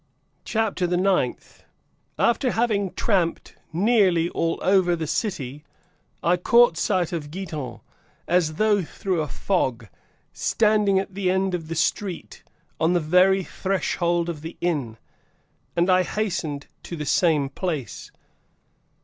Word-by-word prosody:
CHAPTER 215 Hz, -5 st, 0 dB
THE 175 Hz, 0 st, 0 dB
NINTH. 185 Hz, -9 st, -1 dB, 0.5 s
(After 240 Hz, +2 st, +2 dB
having 215 Hz, -5 st, 0 dB
tramped 185 Hz, -6 st, 0 dB, 0.2 s
nearly 185 Hz, -3 st, +3 dB
all 165 Hz, -1 st, -1 dB
over 185 Hz, -2 st, +3 dB
the 160 Hz, -1 st, -3 dB
city,) 150 Hz, -, -3 dB, 0.6 s
I 175 Hz, +1 st, +3 dB
caught 235 Hz, +2 st, +5 dB
sight 180 Hz, 0 st, 0 dB
of 150 Hz, -3 st, -4 dB
Giton, 155 Hz, -8 st, -6 dB, 0.5 s
as 165 Hz, -3 st, +2 dB
though 210 Hz, +1 st, +3 dB
through 185 Hz, 0 st, -2 dB
a 150 Hz, -, -2 dB
fog, 130 Hz, -, -1 dB, 0.5 s
standing 210 Hz, -3 st, +2 dB
at 195 Hz, 0 st, -2 dB
the 190 Hz, -1 st, -1 dB
end 190 Hz, 0 st, +1 dB
of 165 Hz, -3 st, -3 dB
the 165 Hz, -, -4 dB
street, 175 Hz, +2 st, -2 dB, 0.4 s
(on 165 Hz, +2 st, +2 dB
the 175 Hz, -, +3 dB
very 180 Hz, +4 st, +4 dB
threshold 175 Hz, -3 st, -1 dB
of 165 Hz, -4 st, -5 dB
the 165 Hz, +2 st, -8 dB
inn,) 140 Hz, -10 st, -2 dB, 0.8 s
and 170 Hz, +1 st, +2 dB
I 185 Hz, -1 st, +5 dB
hastened 175 Hz, -8 st, -3 dB, 0.2 s
to 170 Hz, -, -7 dB
the 150 Hz, -2 st, -5 dB
same 150 Hz, -1 st, +2 dB
place. 150 Hz, -3 st, -4 dB
180 Hz, 130 wpm, -24 LUFS, 160-195 Hz, 0.8 s, caught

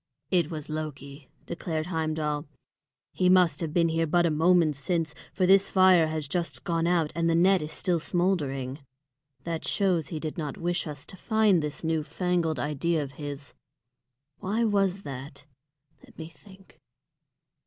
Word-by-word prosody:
"It 175 Hz, -4 st, +2 dB
was 155 Hz, -2 st, -6 dB
Loki," 150 Hz, -2 st, -6 dB, 0.2 s
declared 160 Hz, -2 st, -3 dB
Heimdal. 155 Hz, -3 st, -2 dB, 0.6 s
"He 180 Hz, -, +2 dB
must 180 Hz, -5 st, +4 dB
have 165 Hz, -3 st, -3 dB
been 170 Hz, 0 st, +2 dB
here 165 Hz, 0 st, 0 dB
but 175 Hz, +2 st, +3 dB
a 165 Hz, -, +2 dB
moment 165 Hz, 0 st, +3 dB
since, 160 Hz, +2 st, -1 dB, 0.2 s
for 185 Hz, -, +1 dB
this 195 Hz, +1 st, +5 dB
fire 185 Hz, -4 st, +5 dB
has 155 Hz, -2 st, -3 dB
just 170 Hz, +4 st, -3 dB
gone 165 Hz, -2 st, 0 dB
out, 170 Hz, -3 st, +1 dB
and 165 Hz, +1 st, 0 dB
the 165 Hz, -, +2 dB
net 185 Hz, +2 st, +4 dB
is 150 Hz, +1 st, -5 dB
still 175 Hz, -2 st, 0 dB
smouldering. 150 Hz, -7 st, -1 dB, 0.6 s
That 165 Hz, -1 st, -4 dB
shows 180 Hz, -7 st, +1 dB
he 160 Hz, -, -5 dB
did 155 Hz, +3 st, -5 dB
not 150 Hz, -3 st, -4 dB
wish 175 Hz, 0 st, -1 dB
us 145 Hz, -2 st, -7 dB
to -, -, -11 dB
find 215 Hz, -4 st, +3 dB
this 150 Hz, +1 st, -5 dB
new 160 Hz, -1 st, 0 dB
fangled 170 Hz, 0 st, -1 dB
idea 150 Hz, +2 st, 0 dB
of 140 Hz, -, -8 dB
his. 145 Hz, -1 st, -6 dB, 0.9 s
Why 210 Hz, +4 st, -1 dB
was 200 Hz, -3 st, +1 dB
that? 140 Hz, +1 st, -8 dB, 0.6 s
Let -, -, -19 dB
me 160 Hz, 0 st, -7 dB
think. 190 Hz, +4 st, -19 dB
165 Hz, 165 wpm, -27 LUFS, 150-180 Hz, 0.9 s, this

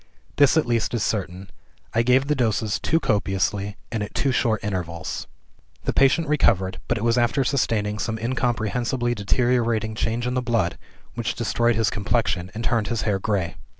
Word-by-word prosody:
This 145 Hz, +1 st, +5 dB
at 160 Hz, -, +3 dB
least 120 Hz, -1 st, 0 dB
is 110 Hz, -, 0 dB
certain, 95 Hz, -2 st, -3 dB, 0.4 s
I 115 Hz, -, +3 dB
gave 125 Hz, +3 st, +3 dB
the 150 Hz, -, +1 dB
doses 110 Hz, -6 st, 0 dB
too 165 Hz, -, +1 dB
copiously 100 Hz, -, -1 dB
and 115 Hz, -2 st, -2 dB
at 105 Hz, -, -5 dB
too 135 Hz, -, +1 dB
short 115 Hz, -3 st, +1 dB
intervals. 90 Hz, -4 st, -4 dB, 0.6 s
"The -, -, -1 dB
patient 140 Hz, +4 st, +3 dB
recovered 95 Hz, -11 st, +2 dB
but 120 Hz, -, 0 dB
it 110 Hz, -, -3 dB
was 115 Hz, +1 st, +3 dB
after 120 Hz, +3 st, +2 dB
sustaining 110 Hz, -6 st, 0 dB
some 110 Hz, +2 st, -2 dB
incomprehensibly 120 Hz, 0 st, -1 dB
deteriorating 115 Hz, 0 st, +1 dB
change 115 Hz, +2 st, -1 dB
in 125 Hz, -, -1 dB
the 125 Hz, -, 0 dB
blood, 115 Hz, -7 st, 0 dB, 0.3 s
which 115 Hz, -2 st, -2 dB
destroyed 120 Hz, +1 st, +1 dB
his 110 Hz, 0 st, +1 dB
complexion, 100 Hz, -3 st, -1 dB
and 115 Hz, -, -4 dB
turned 115 Hz, -3 st, +1 dB
his 115 Hz, -3 st, -1 dB
hair 100 Hz, -3 st, 0 dB
gray. 95 Hz, -5 st, -1 dB
115 Hz, 175 wpm, -23 LUFS, 105-120 Hz, 0.6 s, This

